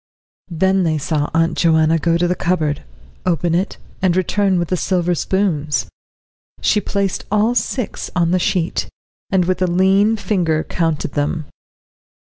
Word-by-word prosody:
Then 190 +3 +2
they 160 -3 +1
saw 150 0 -1
Aunt 165 0 +2
Joanna 160 -1 +3
go 170 +1 +2
to 175 +1 +1
the 180 - +1
cupboard, 165 -5 -1 0.4
open 175 -1 0
it, 185 +4 -1 0.2
and 185 -2 +2
return 190 +1 +1
with 175 -1 -1
the 185 - +1
silver 180 -1 0
spoons; 155 - 0 0.7
she 210 - +2
placed 200 -1 -2
all 215 +3 +3
six 245 +1 -2
on 170 -2 +2
the 185 - +2
sheet, 175 -1 -1 0.4
and 190 -2 +2
with 185 +1 -1
a 185 - +3
lean 195 +5 +3
finger 180 -6 0
counted 165 -4 -1
them. 145 +2 -1
175 Hz, 150 wpm, -19 LUFS, 165-190 Hz, 0.7 s, Joanna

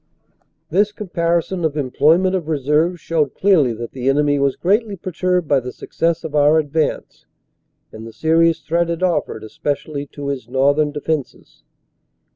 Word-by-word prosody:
This 205 +5 +2
comparison 175 -3 -1
of 155 -2 -1
employment 155 +7 +2
of 175 -5 -3
reserves 155 +4 +1
showed 150 -3 -1
clearly 180 -11 +3
that 115 +1 -7
the 130 0 -2
enemy 145 +1 +2
was 140 -1 +1
greatly 205 +3 0
perturbed 180 -1 -1
by 140 -1 +3
the 125 0 -7
success 165 +4 -2
of 155 - -6
our 150 +1 +4
advance, 155 0 -2 0.6
and 110 +1 -9
the - - -9
serious 165 +4 +2
threat 170 +1 0
it 170 +2 -3
offered 165 -10 -1
especially 145 +5 -4
to 140 0 -6
his 130 -4 -5
northern 140 +3 +2
defenses. 150 -1 -5
155 Hz, 150 wpm, -19 LUFS, 140-170 Hz, 0.6 s, our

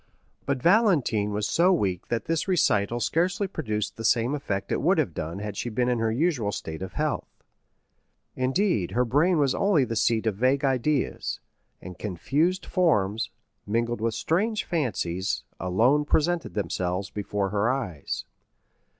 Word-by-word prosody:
But 140 -3 -1
Valentine 170 - +3
was 105 0 -1
so 175 +3 +3
weak 95 - 0
that 115 -3 -2
this 165 +2 -1
recital 120 - +2
scarcely 180 - +1
produced 110 - -3
the 115 - -6
same 115 +4 +2
effect 100 -9 -3
it - - 0
would - - +3
have - - 0
done 80 +3 -4
had 105 0 -5
she 120 - -3
been 120 +2 0
in 125 -2 +1
her 115 0 +1
usual 125 -5 0
state 80 -4 -6
of 95 - -6
health. - - -3 0.9
Indeed, 130 - 0
her 125 +1 +2
brain 160 +9 +3
was 140 -3 +2
only 195 -9 +3
the 115 -1 -4
seat 115 0 +1
of 110 - +1
vague 130 +4 +2
ideas, 135 +1 0 0.4
and 90 0 -9
confused 145 - 0
forms, 115 - +1 0.4
mingled 115 +2 -1
with 115 -1 0
strange 215 +7 0
fancies, 95 - -1 0.2
alone 120 - +2
presented 170 +3 0
themselves 95 -2 -2
before 105 -1 -2
her 105 +3 +1
eyes. 105 - -4
120 Hz, 155 wpm, -26 LUFS, 105-155 Hz, 0.9 s, Valentine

